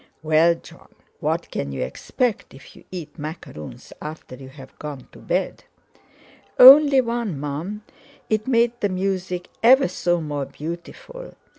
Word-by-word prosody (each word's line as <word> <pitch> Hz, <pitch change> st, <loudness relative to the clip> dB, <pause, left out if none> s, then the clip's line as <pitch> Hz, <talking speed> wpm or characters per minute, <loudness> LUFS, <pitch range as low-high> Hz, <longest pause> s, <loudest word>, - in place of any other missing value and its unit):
"Well, 160 Hz, +2 st, +4 dB
Jon, -, -, -16 dB, 0.3 s
what -, -, -2 dB
can 70 Hz, -, -4 dB
you 65 Hz, -, -3 dB
expect 205 Hz, -, -3 dB
if 135 Hz, -, -15 dB
you -, -, -17 dB
eat 170 Hz, -4 st, -8 dB
macaroons 150 Hz, -, -9 dB
after 155 Hz, -3 st, -8 dB
you've 130 Hz, 0 st, -13 dB
gone 145 Hz, -4 st, -8 dB
to -, -, -15 dB
bed?" -, -, -3 dB, 0.9 s
"Only 275 Hz, +1 st, +9 dB
one, 230 Hz, -, -3 dB
Mum; 160 Hz, +9 st, -5 dB, 0.4 s
it 215 Hz, +1 st, -1 dB
made 235 Hz, -2 st, +3 dB
the 205 Hz, -, +1 dB
music 185 Hz, -1 st, -3 dB
ever 260 Hz, +2 st, +6 dB
so 175 Hz, -1 st, -1 dB
more 145 Hz, -3 st, -4 dB
beautiful. 170 Hz, -, -9 dB
175 Hz, 135 wpm, -22 LUFS, 150-225 Hz, 0.9 s, Only